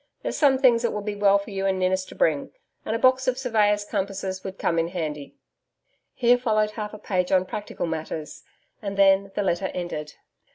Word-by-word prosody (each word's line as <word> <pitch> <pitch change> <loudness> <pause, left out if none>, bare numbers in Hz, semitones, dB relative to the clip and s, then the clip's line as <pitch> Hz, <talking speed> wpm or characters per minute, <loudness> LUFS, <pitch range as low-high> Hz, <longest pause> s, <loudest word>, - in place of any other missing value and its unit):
There's - - -2
some 275 -3 +4
things 245 -3 +4
it 235 - 0
would 210 -1 -4
be 210 - -2
well 200 -1 +4
for 200 +2 -7
you 195 0 -1
and 190 -1 +1
Ninnis 185 0 +1
to - - -12
bring, - - +1 0.4
and 220 - -1
a - - +1
box 260 +2 +3
of 255 0 +1
surveyor's 210 -5 +2
compasses 195 -2 -3
would 190 0 -6
come 165 - 0
in 165 - +1
handy. 155 -5 -5 0.8
Here 245 0 +4
followed 215 -3 +1
half 210 -1 -5
a - - -8
page 180 -3 -1
on 185 -1 +3
practical 205 -1 -5
matters, 160 -1 -5 0.4
and 200 -2 -5
then 195 0 +4
the 205 - 0
letter 190 0 0
ended. 155 -4 -5
200 Hz, 205 wpm, -25 LUFS, 185-215 Hz, 0.8 s, some